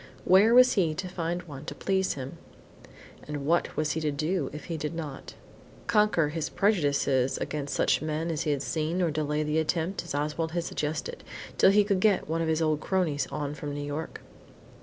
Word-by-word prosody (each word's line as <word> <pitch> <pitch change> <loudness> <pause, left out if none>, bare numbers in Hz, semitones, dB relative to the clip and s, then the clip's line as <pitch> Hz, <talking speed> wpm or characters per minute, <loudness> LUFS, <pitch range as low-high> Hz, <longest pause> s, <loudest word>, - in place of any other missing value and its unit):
Where 205 +6 +6
was 250 0 +7
he 165 -6 +1
to 185 +3 -4
find 175 -1 -3
one 145 -4 -9
to - - -6
please 190 -1 0
him? 135 -1 -7 0.9
And 145 -2 -4
what 170 +3 +1
was 155 -1 +1
he 160 - -2
to 155 - 0
do 155 +1 -1
if 150 - -8
he 170 - -4
did 155 +1 -4
not? 150 -5 -7 0.5
Conquer 210 -8 +3
his 160 0 -3
prejudices 140 - +1
against 145 -2 -3
such - - +2
men 155 +2 -2
as 155 -1 -2
he 155 - -1
had 145 -2 0
seen, 165 +3 -1
or 165 - +1
delay 150 0 -1
the 150 +1 +1
attempt, 165 +3 -1
as - - -5
Oswald 150 +2 -2
had 170 -1 0
suggested, 160 - -4 0.4
till - - +7
he 205 +1 +5
could 200 -2 +1
get 205 -1 +2
one 165 +1 -1
of 165 - 0
his 160 0 +1
old 155 -1 +1
cronies 165 -5 0
on 145 -1 -4
from 145 -1 -5
New 145 - -4
York. 145 +3 -5
160 Hz, 200 wpm, -28 LUFS, 150-180 Hz, 0.9 s, was